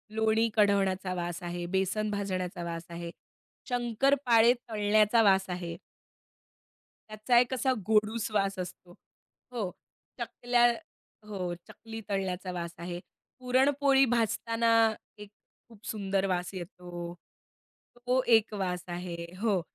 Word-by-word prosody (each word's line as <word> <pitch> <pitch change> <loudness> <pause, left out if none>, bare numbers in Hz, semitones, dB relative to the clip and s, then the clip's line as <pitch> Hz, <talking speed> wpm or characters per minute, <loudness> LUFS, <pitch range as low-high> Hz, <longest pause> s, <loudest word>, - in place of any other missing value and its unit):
लोणी 220 +1 +3
कढवण्याचा 195 -3 +2
वास 175 0 -4
आहे, 175 0 -4
बेसन 205 +3 0
भाजण्याचा 185 -3 -3
वास 170 0 -5
आहे. 170 0 -6 0.6
शंकरपाळे 245 0 +3 0.2
तळण्याचा 215 +1 +3
वास 195 -2 +4
आहे. 175 -2 -4 1.3
त्याचा 215 +3 +2
एक 245 +1 +1
असा 260 +1 +1 0.2
गोडूस 215 +1 +2
वास 195 -1 0
असतो. 180 0 -7 0.6
हो. 215 -7 -3 0.5
चकल्या 245 0 +2 0.6
हो 185 -4 -3
चकली 225 0 -9
तळल्याचा 190 -2 -2
वास 170 -1 -4
आहे. 175 +1 -5 0.4
पुरणपोळी 270 +2 +3
भाजताना 230 0 +1 0.5
एक 210 -1 -10 0.4
खूप 220 -2 -17
सुंदर 195 -2 -1
वास 180 0 -2
येतो. 175 -1 -7 0.8
तो 250 +1 +1
एक 220 -1 +2
वास 180 -3 -2
आहे 175 0 -5 0.3
हो. 210 -5 +2
205 Hz, 110 wpm, -29 LUFS, 180-230 Hz, 1.3 s, वास